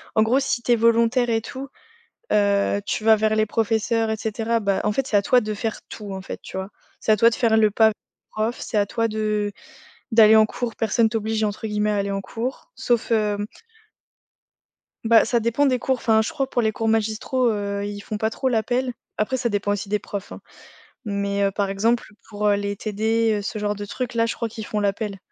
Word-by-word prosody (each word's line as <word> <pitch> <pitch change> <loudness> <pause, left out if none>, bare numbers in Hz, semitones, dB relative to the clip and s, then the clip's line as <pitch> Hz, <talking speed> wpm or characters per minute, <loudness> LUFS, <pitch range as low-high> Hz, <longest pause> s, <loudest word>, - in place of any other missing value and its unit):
en 220 - +5
gros, 240 +5 +3
si 265 -3 -1
tu 240 - 0
es - - +7
volontaire 230 +2 +3
et 225 -1 +1
tout, 265 +4 -7 0.6
heu, 200 -1 +2
tu 215 - -2
vas 220 0 +6
vers 215 0 +1
les 215 0 +3
professeurs 225 +1 0
et 220 - 0
cetera 225 +1 -1
bah, 200 -2 +1
en 210 - +1
fait, 270 +4 0
c'est 210 - +2
à - - +3
toi 250 +5 +3
de 215 -1 -3
faire 220 +1 -4
tout 205 -3 -7
en 190 - -5
fait, 185 - -7
tu - - -10
vois? 190 +1 -4 0.3
C'est - - +1
à 215 - +4
toi 230 +3 +6
de 230 - -3
faire 225 -2 +2
le 215 -1 +5
pas 220 +1 +4 0.4
prof, 220 +3 -2
c'est 215 - -3
à 205 - +3
toi 230 +2 -1
de 215 -1 -1 0.6
d'aller 220 -1 +7
en 220 0 +6
cours, 235 0 -4
personne 225 +1 +2
«t'oblige» 220 0 -1
entre 210 +1 -2
guillemets 210 0 0
à 205 - 0
aller 200 0 -1
en 195 0 -2
cours, 240 - -5
sauf 240 -1 0
hem 210 -2 +1 1.6
Bah 225 -1 +5
ça 240 - +1
dépend 235 +5 +1
des 255 -2 +2
cours, 265 +2 0
enfin, 225 -3 +2
je 220 - -2
crois 280 -4 -2
pour 245 - 0
les 220 -1 +1
cours 225 +1 -3
magistraux, 225 +3 +1
heu 200 -1 -3
ils 205 0 -5
font 210 0 -5
pas 220 - +1
trop 260 +4 -1
l'appel. 250 +2 0 0.2
Après 215 +5 0
ça 245 -2 -1
dépend 205 -1 -1
aussi 205 0 -3
des 210 - +2
profs, 200 -1 -7
hein. - - -9 0.6
Mais, 200 -1 -1
heu, 200 - +3
par 200 0 -1
exemple 220 +4 0 0.2
pour, 210 -1 -2
heu, 205 - +4
les 200 0 -2
TD, 220 +1 0
heu, - - -4
ce 215 +1 -4
genre 210 0 -1
de 205 0 -6
trucs-là, 230 +1 -1
je 230 - -3
crois 230 - -2
qu'ils 220 0 -8
font 210 - -2
l'appel. 200 0 -2
220 Hz, 230 wpm, -23 LUFS, 205-230 Hz, 1.6 s, es